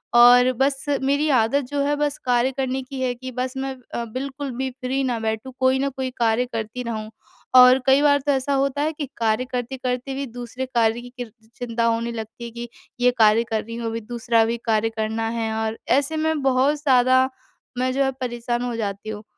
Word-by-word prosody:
और 245 +1 +7
बस 270 +3 0 0.2
मेरी 285 +3 +1
आदत 255 +6 +1
जो 285 -1 0
है 290 +1 +1
बस 290 0 -1
कार्य 245 +1 +2
करने 265 0 -1
की 265 +1 -8
है 255 -1 0
कि 255 +1 -8
बस 255 +1 -3
मैं 265 0 -3 0.2
अ, 235 - -2
बिल्कुल 270 +4 -5
भी 265 +1 -2
फ्री 260 +1 -2
ना 245 -3 -1
बैठूँ, 220 +3 -3
कोई 260 0 +3
न 275 +1 0
कोई 260 -1 -4
कार्य 230 +1 +2
करती 225 +2 -4
रहूँ। 220 -2 -4 0.5
और 255 +1 +8
कई 270 +1 +5
बार 285 -1 +4
तो 290 - +3
ऐसा 270 +1 0
होता 275 +1 0
है 310 +2 +1
कि 300 -1 -4
कार्य 225 +2 +1
करते-करते 250 +1 -3
भी 275 +1 -3
दूसरे 245 +1 -6
कार्य 230 0 +2
की 245 - -10
किर 245 -3 -6 0.2
चिंता 230 -1 -2
होने 230 0 0
लगती 225 +1 -7
है 235 - -5
कि 240 +1 -7 0.3
ये 250 0 +4
कार्य 220 0 +5
कर 220 -1 0
रही 230 +1 -8
हूँ, 235 -1 -4
अभी 225 0 -3
दूसरा 230 0 +1
भी 230 +1 -1
कार्य 225 -1 +2
करना 225 0 -2
है 225 -1 -2
और 220 0 -2 0.2
ऐसे 285 +3 -1
में 315 -1 0
बहुत 270 +2 +3
ज़्यादा 260 -2 +4 0.5
मैं 255 +1 +1
जो 275 +1 +2
है 270 - +1
परेशान 240 -1 -2
हो 245 -1 -3
जाती 205 -1 -4
हूँ। 210 -1 -6
250 Hz, 215 wpm, -23 LUFS, 230-265 Hz, 0.5 s, और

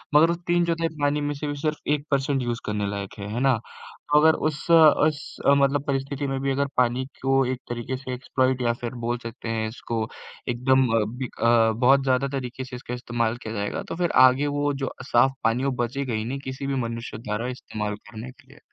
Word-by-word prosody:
मगर 160 +3 +7
उस 170 - -2
3/4 170 -1 +2
पानी 145 +1 +2
में 145 0 -1
से 150 +1 -4
भी 145 - -2
सिर्फ 155 -1 0 0.2
1 145 0 -8
पर्सेंट 135 -1 +1
यूज़ 120 -1 -2
करने 105 -1 -1
लायक 100 -1 -5
है, 100 - -5
है 120 - -1
ना? 135 -2 +4
तो 145 +5 -2
अगर 160 0 +6 0.2
उस 150 +2 -8
उस 155 -2 +5
मतलब 140 0 +4
परिस्थिति 140 +1 -2
में 135 0 -2
भी 135 0 0
अगर 140 +1 +1
पानी 125 +1 +2 0.2
को 135 0 +3
एक 130 0 -2
तरीके 120 +2 -3
से 130 -1 -6
एक्सप्लॉइट 130 0 0
या 120 -1 +2
फिर 120 +1 -4
बोल 120 +1 0
सकते 115 0 -7
हैं 110 -1 -1
इसको 115 -1 -3 0.4
एकदम 130 +2 +3 0.3
बिक 130 -2 -6
अ, 115 -1 +5
बहुत 135 +3 +4
ज़्यादा 130 +1 +2
तरीके 130 0 -5
से 125 - -8
इसका 125 0 -7
इस्तेमाल 120 -1 -1
किया 110 -2 -7
जाएगा, 100 -1 -3
तो - - -6
फिर 175 -1 0 0.2
आगे 135 +3 +1
वो 145 0 0
जो - - -2 0.2
साफ 130 +3 +5
पानी 115 +4 +2
वो 140 - +1
बचेगा 130 0 -3
ही 110 0 -1
नहीं 135 +3 -3
किसी 130 +1 -5
भी 140 - -1
मनुष्य 115 -1 -6
द्वारा 110 +2 -3
इस्तेमाल 105 -1 -4
करने 115 +3 -8
के 130 - -23
लिए। 140 +3 -17
130 Hz, 215 wpm, -25 LUFS, 120-140 Hz, 0.4 s, मगर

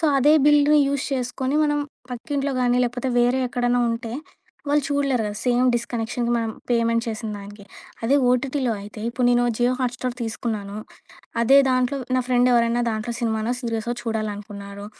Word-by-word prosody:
So, - - -1 0.2
అదే 295 +4 +5
bill 295 0 +5
use 280 -1 -1
చేసుకొని 260 +2 -2
మనం 295 -1 +1 0.3
పక్కింట్లో 275 +3 -3
గాని, 245 0 +2
లేకపోతే 245 +2 -2
వేరే 245 +2 +2
ఎక్కడైనా 245 0 +1
ఉంటే, 230 0 -4 0.6
వాళ్ళు 295 +1 +3
చూడలేరు 280 -4 +1
కదా! 205 - -4
సేమ్ 250 0 +3
డిష్ 235 -1 -1
కనెక్షన్‌కి 235 +1 -1
మనం 225 -1 -1 0.2
పేమెంట్ 230 -1 +2
చేసిన 220 0 -4
దానికి. 200 0 -11 0.4
అదే 235 +5 +2 0.2
ఓటీటీలో 255 0 0
అయితే 210 +1 -10
ఇప్పుడు 245 +1 0
నేను 245 0 +3
'జియో 245 +1 +2
హాట్‌స్టార్' 250 0 -2
తీసుకున్నాను. 220 -3 -4 0.6
అదే 265 +4 +6
దాంట్లో 255 +1 +1 0.2
నా - - +3
ఫ్రెండెవరైనా 240 -1 +3
దాంట్లో 220 +2 -3
సినిమానో 220 -1 -1
సీరిసో 230 -1 -3
చూడాలనుకున్నారు. 205 -2 -5
240 Hz, 150 wpm, -23 LUFS, 225-255 Hz, 0.6 s, అదే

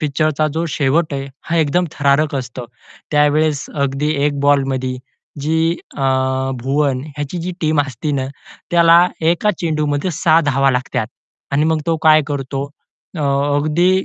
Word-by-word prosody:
पिक्चरचा 155 0 0
जो 165 +1 -1
शेवट 155 +2 0
आहे 135 0 -4 0.2
हा 170 - 0
एकदम 165 +3 +2
थरारक 140 +1 +1
असतो. 125 -2 -5 0.5
त्यावेळेस 150 0 +2
अगदी 140 +1 -1 0.2
1 145 -1 0
बॉलमध्ये 135 -2 +1 0.4
जी 160 +3 +1 0.2
अ, - - -6 0.6
भुवन 135 0 0
ह्याची 145 +3 -5
जी 180 +2 -4
टीम 155 -2 +2
असते 140 +1 -3
ना 135 -2 -1 0.4
त्याला 170 +1 +6
एका 170 +6 +2
चेंडूमध्ये 150 0 -1
6 165 0 +3
धावा 135 0 +3
लागतात. 125 -2 -1 0.5
आणि 145 +2 +2
मग 160 0 +1
तो 165 -1 +1
काय 155 0 +6
करतो. 135 -1 -3 0.5
अ, - - -3 0.4
अगदी 155 +5 +2
150 Hz, 140 wpm, -18 LUFS, 140-160 Hz, 0.6 s, त्याला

